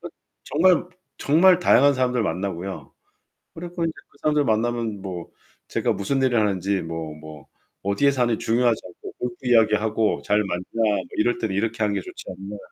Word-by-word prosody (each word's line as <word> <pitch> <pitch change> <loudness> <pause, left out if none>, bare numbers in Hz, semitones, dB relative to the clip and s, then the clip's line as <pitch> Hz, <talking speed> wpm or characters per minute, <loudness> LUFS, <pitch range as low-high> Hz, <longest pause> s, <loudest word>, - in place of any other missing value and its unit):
그 - - -7 0.4
정말 175 +3 +3 0.3
정말 175 +5 +5
다양한 140 -4 +5
사람들 125 -1 +1
만나고요. 95 +1 -4 0.6
그리고 175 +1 -5
인제 165 - -1 0.2
그 - - -25
사람들 150 -1 +2
만나면 115 -2 -1
뭐 90 -3 -6 0.4
제가 - - 0
무슨 135 +7 -1
일을 125 -3 +3
하는지 100 -2 0
뭐, 80 -1 -5
뭐 75 -2 -12 0.4
어디에 100 +9 +2
사는지 120 -4 +1
중요하지 120 0 +2
않고 90 - -11
골프 120 -1 -3
이야기하고 110 -2 +2
잘 105 +1 +2
맞나 90 -2 -3
뭐 110 -2 +2 0.2
이럴 120 - +2
때는 110 -5 -2
이렇게 110 +2 -1
하는 105 -1 +1
게 - - 0
좋지 - - -10
않나. 95 +3 -7
110 Hz, 360 characters per minute, -23 LUFS, 100-125 Hz, 0.6 s, 정말